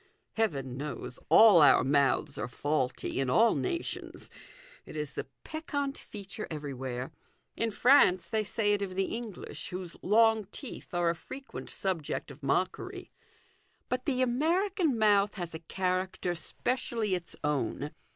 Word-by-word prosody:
Heaven 135 - -1
knows 145 -3 -6
all 210 -7 +8
our 145 - +7
mouths 140 -3 +2
are 110 - -2
faulty 135 0 -1
in 135 -2 0
all 225 - +5
nations 350 -2 -4 0.5
it - - -11
is 150 -2 -4
the - - -5 0.2
peccant 285 -3 -3
feature 205 +1 -8
everywhere. 135 -3 -5 0.4
In 230 - 0
France 200 -7 +5
they 215 +4 0
say 205 0 +1
it 205 - 0
of 190 -2 -3
the 195 0 -1
English, 225 -4 -7
whose 180 -1 -5
long 220 +1 +4
teeth 210 -2 -8
are 175 -1 +3
a - - -4
frequent 270 +10 -9
subject 170 -6 -3
of 140 - -13
mockery: 365 - -2 0.8
but 255 0 -2
the 255 -3 +2
American 325 - +1
mouth 205 -2 +4
has 175 -4 -5
a 160 - -5
character 185 +1 -1
specially 225 +5 -2
its 180 -2 -2
own. 150 0 -1
190 Hz, 140 wpm, -30 LUFS, 150-230 Hz, 0.8 s, all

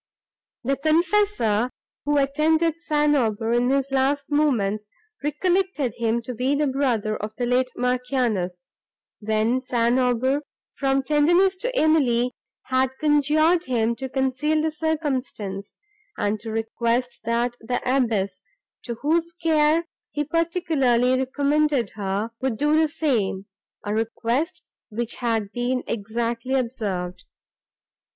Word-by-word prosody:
The 275 +3 0
confessor, 315 - +2 0.4
who 295 0 +2
attended 315 +4 +2
St. 295 -2 +2
Aubert 225 -3 0
in 240 +1 +2
his 275 0 +1
last 275 +2 0
moments, 215 -9 +1 0.4
recollected 330 - 0
him 235 0 -1
to 250 - -5
be 255 +4 0
the 295 +1 +1
brother 250 -6 0
of 215 +1 -6
the 245 - -1
late 250 +1 +2
Marchioness, 245 -8 -1 0.5
when 220 +4 +1
St. 245 -1 +1
Aubert, 255 +3 +1 0.3
from 270 -1 0
tenderness 345 +7 +3
to - - -3
Emily, 255 - +3 0.3
had 260 0 0
conjured 310 +3 +3
him 235 -2 +1
to 265 0 -5
conceal 265 +4 0
the 315 +1 0
circumstance, 265 -11 -3 0.4
and 205 +1 0
to 225 +2 -7
request 230 +2 -1
that 235 +1 0
the 245 +2 -1
abbess, 220 -8 0 0.4
to 235 - -3
whose 330 +3 +1
care 320 -1 +2 0.2
he 295 - -2
particularly 300 -7 +1
recommended 280 -2 +1
her, 200 +2 -3
would 260 -4 -1
do 295 +4 +2
the 315 0 +4
same; 225 -11 -1 0.4
a 205 - -1
request, 230 +8 -1 0.3
which 235 +1 -2
had 225 -4 -1
been 250 +1 -1
exactly 230 +4 -2
observed. 210 -8 -3
255 Hz, 125 wpm, -24 LUFS, 230-300 Hz, 0.5 s, the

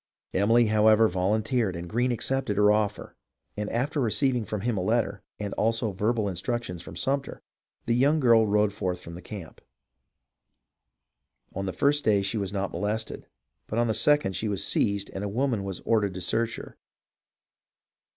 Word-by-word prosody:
Emily, 115 +5 +4
however, 110 +1 +5
volunteered 105 +3 0
and 85 +1 -6
Greene 120 +7 0
accepted 125 -3 -1
her 105 0 +5
offer; 105 -1 -1 0.4
and 105 0 -3
after 140 +6 -1
receiv 130 +2 +2
ing 120 -3 -2
from 105 0 -4
him 120 +1 -1
a 95 - -1
letter, 105 0 0 0.2
and 105 -1 -4
also 115 0 0
verbal 105 +3 0
instructions 95 0 -3
for - - -10
Sumter, 135 0 -2 0.4
the 115 - +1
young 140 +6 +3
girl 115 -5 +5
rode 105 0 +2
forth 90 -3 -3
from 85 - -10
the 90 - -9
camp. 95 -7 -9 1.9
On 95 +1 -3
the - - -1
first 145 - +1
day 100 -2 +3
she 100 +3 -1
was 100 -1 -3
not 100 -1 -2
molested, 105 +2 -3 0.4
but 110 - -4
on 120 - +3
the 110 - 0
second 145 -8 +2
she 110 - -1
was 100 -1 -1
seized 100 -2 0
and 95 - -5
a 100 - -2
woman 120 -1 0
was 95 -2 -5
ordered 105 -5 +1
to 90 - -5
search 115 +4 -1
her. - - -10
105 Hz, 175 wpm, -27 LUFS, 100-120 Hz, 1.9 s, however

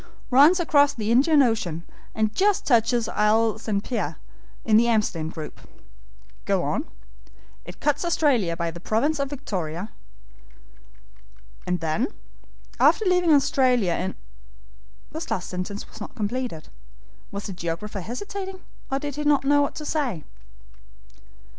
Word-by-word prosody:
"Runs 295 +8 +7
across 290 -4 +3
the 220 -1 -2
Indian 285 +4 +5
Ocean, 180 -9 -1 0.3
and 215 -1 0
just 400 - +2
touches 235 -2 +3
Isle 220 +1 +2
St. 210 -3 -2
Pierre, 185 - -3 0.5
in 215 - +4
the 235 +2 +5
Amsterdam 205 -8 0
group." 155 -2 -8 0.8
"Go - - +1
on." - - -1 0.8
"It 175 +1 -10
cuts 295 +1 +1
Australia 265 - +1
by 170 -1 -2
the 170 - -9
province 275 - 0
of 280 -1 -1
Victoria." 195 - -4 1.8
"And 180 -1 -1
then." 165 +9 0 0.7
"After 435 - +4
leaving 360 -3 +3
Australia 260 - +3
in 185 +3 -3 0.5
" - - -29
This 320 +2 -6
last 180 - -2
sentence 185 +3 -5
was - - -14
not 215 - -8
completed. 230 - -3 0.6
Was 200 0 -6
the 195 - -5
geographer 175 +4 -4
hesitating, 380 - -6 0.3
or 270 - +1
didn't 290 0 -5 0.2
he 275 - -5
know 290 0 +5
what 285 - -1
to 305 - -6
say? 255 - -1
225 Hz, 135 wpm, -24 LUFS, 180-285 Hz, 1.8 s, Runs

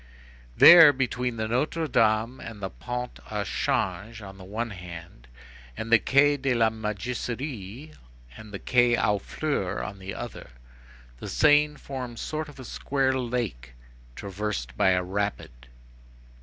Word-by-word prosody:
There, 165 -4 +10
between 125 -3 -2
the 110 0 -2
Notre 150 +7 -1
Dame 115 0 +1
and 110 -3 -9
the 95 -1 -5
Pont 125 0 -6
au 105 -1 -2
Change 110 +2 -2
on 95 -1 -11
the - - -10
one 110 +5 -4
hand, 85 -8 -10 0.5
and 115 - -5
the 115 - +7
Quai 145 +4 +3
de 135 -2 0
la 115 -1 +3
Mégisserie 115 +4 -5 0.4
and 110 - -12
the 100 - -5
Quai 120 +2 +3
aux 105 0 +1
Fleurs 140 -5 -3
on 100 - -7
the 95 0 -7
other, - - -8 0.7
the - - -7
Seine 150 0 +4
forms 125 -5 -7
a - - -4
sort 155 0 -4
of 135 -3 -11
square 135 +2 -1
lake, 120 - -3 0.4
traversed 100 - -4
by 95 - +3
a 90 -1 +2
rapid. 95 -10 -4
115 Hz, 145 wpm, -26 LUFS, 100-130 Hz, 0.7 s, There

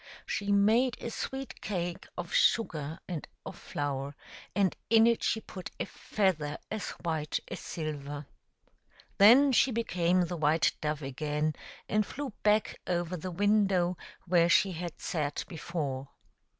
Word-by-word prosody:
She 200 0 -2
made 220 +5 +4
a 235 - -5
sweet 265 +3 -5
cake 175 -4 -3
of - - -5
sugar 165 - +2
and 170 -5 -5 0.2
of - - -7
flour, 140 0 -4 0.4
and 195 -3 +2
in 225 0 +7
it 235 -1 +3
she 220 - +1
put 185 -4 -8
a - - 0
feather 160 -8 -1
as 215 -4 -3
white 160 -3 -1
as - - -5
silver. 145 -2 -5 0.9
Then 250 +8 +8
she 265 - +4
became 185 -6 +1
the 175 0 -3
white 155 +1 +3
dove 150 -1 -2
again, 150 +3 -1 0.3
and 215 0 +2
flew 270 +3 -6
back 210 0 +2
over 175 0 -1
the 180 +2 -5
window 195 -1 +2 0.3
where 170 -1 +4
she 190 +3 +5
had 175 -1 -6
sat 150 -4 -2
before. 145 -5 -4
175 Hz, 140 wpm, -30 LUFS, 155-210 Hz, 0.9 s, Then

